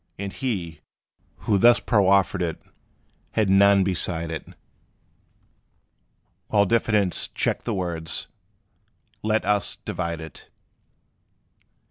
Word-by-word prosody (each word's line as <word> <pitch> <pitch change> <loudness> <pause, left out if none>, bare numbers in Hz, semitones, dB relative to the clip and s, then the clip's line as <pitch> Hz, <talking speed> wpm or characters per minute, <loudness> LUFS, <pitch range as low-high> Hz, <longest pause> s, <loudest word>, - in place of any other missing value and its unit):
And 100 0 -5
he, 90 - -4 0.7
who 100 -3 +2
thus 120 +4 +6
proffered 100 -5 +2
it, 85 -2 -2 0.7
had 105 -3 +1
none 100 0 +5
beside 85 -3 0
it; 80 - -6 2.0
While 105 -1 +3
diffidence 105 -3 +1
checked - - -2
the - - -1
words, 85 -4 -3 0.9
"Let 110 +1 0
us 105 -2 +1
divide 85 -2 -5
it." 80 -4 -11
95 Hz, 95 wpm, -24 LUFS, 85-105 Hz, 2.0 s, thus